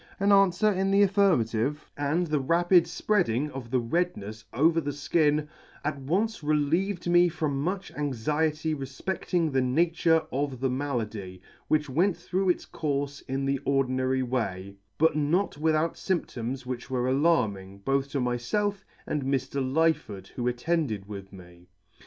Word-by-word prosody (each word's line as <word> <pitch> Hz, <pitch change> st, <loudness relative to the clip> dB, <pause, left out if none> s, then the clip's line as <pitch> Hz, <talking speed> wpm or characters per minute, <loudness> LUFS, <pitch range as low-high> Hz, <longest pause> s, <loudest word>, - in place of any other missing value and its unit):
An 200 Hz, +1 st, +2 dB
anfwer 195 Hz, +1 st, +4 dB
in 190 Hz, +1 st, +1 dB
the 200 Hz, +1 st, +5 dB
affirmative, 150 Hz, -, +1 dB
and 145 Hz, +5 st, 0 dB
the 150 Hz, -3 st, 0 dB
rapid 175 Hz, +5 st, +4 dB
fpreading 150 Hz, -, 0 dB
of 130 Hz, -3 st, -7 dB
the 130 Hz, +1 st, +2 dB
rednefs 115 Hz, -, -2 dB
over 165 Hz, +6 st, +3 dB
the 145 Hz, -1 st, -5 dB
{kin, 150 Hz, -2 st, +3 dB, 0.4 s
at 150 Hz, -2 st, -1 dB
once 200 Hz, +11 st, -1 dB
relieved 165 Hz, +6 st, 0 dB
me 175 Hz, 0 st, +5 dB
from 155 Hz, -4 st, -2 dB
much 185 Hz, +5 st, -3 dB
anxiety 150 Hz, +3 st, -1 dB
refpecfting 160 Hz, +4 st, -2 dB
the 135 Hz, -, +3 dB
nature 160 Hz, +4 st, +2 dB
of 135 Hz, -1 st, -2 dB
the 130 Hz, 0 st, 0 dB
malady, 110 Hz, -9 st, -3 dB, 0.3 s
which 150 Hz, -1 st, +2 dB
went 170 Hz, +8 st, +1 dB
through 185 Hz, +1 st, -1 dB
its 175 Hz, -, +1 dB
courfe 145 Hz, -2 st, -3 dB
in 135 Hz, +1 st, -2 dB
the 135 Hz, 0 st, 0 dB
ordinary 130 Hz, -1 st, +1 dB
way, 100 Hz, -6 st, -3 dB, 0.2 s
but 160 Hz, 0 st, +3 dB
not 155 Hz, +5 st, +1 dB
without 160 Hz, +1 st, +2 dB
fymptoms 130 Hz, -8 st, -3 dB
which 125 Hz, +1 st, -5 dB
were 125 Hz, -1 st, 0 dB
alarming, 120 Hz, -, +1 dB
both 135 Hz, +6 st, -1 dB
to 140 Hz, -, -2 dB
myfelf 125 Hz, -, 0 dB, 0.3 s
and 150 Hz, -, -2 dB
Mr. 135 Hz, 0 st, -1 dB
Lyford, 135 Hz, -, 0 dB
who 120 Hz, -1 st, -3 dB
attended 125 Hz, -, -1 dB
with 100 Hz, -2 st, -8 dB
me. 90 Hz, -2 st, -14 dB
145 Hz, 145 wpm, -27 LUFS, 125-170 Hz, 0.4 s, the